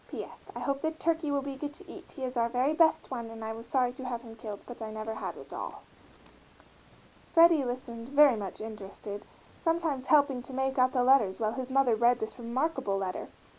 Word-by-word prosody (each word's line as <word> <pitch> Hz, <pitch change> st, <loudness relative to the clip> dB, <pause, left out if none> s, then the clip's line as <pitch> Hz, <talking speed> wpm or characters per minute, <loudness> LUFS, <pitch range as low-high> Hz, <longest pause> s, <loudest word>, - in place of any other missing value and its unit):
P. -, -, -4 dB
S. -, -, -10 dB, 0.2 s
I -, -, -5 dB
hope 275 Hz, -1 st, -1 dB
the 315 Hz, -, +1 dB
turkey 320 Hz, -1 st, -1 dB
will 280 Hz, -1 st, 0 dB
be 275 Hz, -1 st, -4 dB
good 290 Hz, +1 st, -5 dB
to -, -, -13 dB
eat, -, -, -11 dB
he 270 Hz, -, -7 dB
is 255 Hz, 0 st, -3 dB
our 235 Hz, -1 st, +2 dB
very 255 Hz, +5 st, +2 dB
best 320 Hz, -3 st, +3 dB
one 235 Hz, -3 st, -4 dB
and 225 Hz, -1 st, -7 dB
I 220 Hz, -, -3 dB
was 230 Hz, +1 st, -9 dB
sorry 250 Hz, -2 st, +2 dB
to 260 Hz, 0 st, -8 dB
have 240 Hz, -1 st, -3 dB
him 225 Hz, -2 st, -10 dB
killed, 215 Hz, -2 st, -7 dB
but 245 Hz, -1 st, -9 dB
I 220 Hz, -, -4 dB
never 215 Hz, +1 st, -4 dB
had -, -, -5 dB
a -, -, -8 dB
dol. -, -, -7 dB, 1.4 s
Freddie 330 Hz, -3 st, +6 dB
listened, 245 Hz, -1 st, -5 dB
very 285 Hz, -2 st, +7 dB
much 200 Hz, -3 st, -5 dB
interested, 205 Hz, -1 st, -7 dB, 0.4 s
sometimes 325 Hz, -6 st, 0 dB
helping 285 Hz, -4 st, +4 dB
to 260 Hz, -, -9 dB
make 265 Hz, 0 st, 0 dB
out 255 Hz, 0 st, +4 dB
the 250 Hz, -2 st, +3 dB
letters 245 Hz, -7 st, +4 dB
while 215 Hz, -1 st, 0 dB
his 260 Hz, -1 st, -4 dB
mother 265 Hz, -2 st, +4 dB
read 240 Hz, +2 st, +4 dB
this 220 Hz, +3 st, -5 dB
remarkable 245 Hz, -3 st, -1 dB
letter. 190 Hz, -2 st, -3 dB
255 Hz, 220 wpm, -30 LUFS, 225-275 Hz, 1.4 s, very